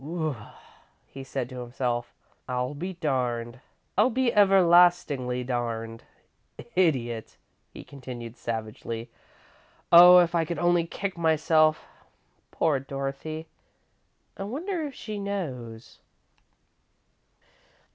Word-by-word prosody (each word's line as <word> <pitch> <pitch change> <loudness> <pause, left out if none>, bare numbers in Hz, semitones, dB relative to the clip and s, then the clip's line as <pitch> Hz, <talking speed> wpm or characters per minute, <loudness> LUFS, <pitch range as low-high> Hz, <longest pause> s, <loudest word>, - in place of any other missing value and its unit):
"Whew!" 155 -1 -3 0.7
he 135 - -10
said 130 -2 -4
to 130 -1 -8
himself. 120 -1 -3 0.4
"I'll 125 +2 -2
be 180 +6 -5
darned! 125 -7 -2 0.4
I'll - - +4
be 255 -1 0
everlastingly 175 -10 +4
darned! 115 -2 -4 0.7
Idiot!" 125 - 0 0.3
he - - -10
continued, 125 -4 -9
savagely. 115 0 -5 0.8
"Oh, 180 +1 +10
if 175 -1 +4
I 170 -1 +2
could 165 +1 -4
only 175 0 +2
kick 190 0 -5
myself! 155 -1 +3 0.6
Poor 150 -4 +1
Dorothy! 140 +4 -5 0.9
I - - -8
wonder 320 - -3
if 275 - -11
she 215 -2 -6
knows!" 130 - -6
145 Hz, 100 wpm, -26 LUFS, 125-175 Hz, 0.9 s, Oh